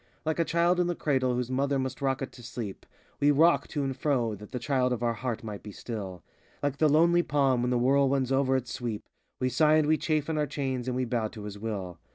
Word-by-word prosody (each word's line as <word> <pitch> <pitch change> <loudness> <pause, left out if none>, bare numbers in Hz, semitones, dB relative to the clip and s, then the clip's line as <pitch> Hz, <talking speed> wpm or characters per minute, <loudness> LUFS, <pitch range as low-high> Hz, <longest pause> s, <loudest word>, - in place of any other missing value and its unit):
Like 160 +1 -1
a - - +4
child 170 +2 +2
in 175 - +2
the 175 - -1
cradle 130 -5 +1
whose 125 0 -2
mother 140 +2 +1
must 130 0 -3
rock 135 0 0
it 130 - -6
to 125 - -13
sleep, 115 -4 -7 0.3
We 145 - +4
rock 160 +4 +4
to 145 -3 -2
and 135 -1 -2
fro 130 -5 0
that 105 0 -10
the - - -3
child 125 0 +1
of 120 -1 -3
our 120 -1 +2
heart 115 0 -4
might 105 -2 -6
be 105 - -9
still; 95 -6 -6 0.4
Like 140 -1 0
the 155 0 +4
lonely 170 +4 +5
palm, 135 -6 +2
when 125 - 0
the 125 - +2
whirlwinds 135 +1 +2
over 135 0 +2
it 130 -2 -1
sweep, 115 -4 -4 0.3
We 130 - +1
sigh 150 +4 +4
and 155 -1 +3
vvc 155 0 +2
chafe 155 -2 0
in 160 -1 -1
our 150 - +1
chains, 130 -3 -3
and 125 - -1
we 130 0 0
bow 115 -2 -1
to 105 -1 -10
his 105 -1 -7
will. 95 -6 -5
130 Hz, 250 wpm, -28 LUFS, 120-145 Hz, 0.4 s, lonely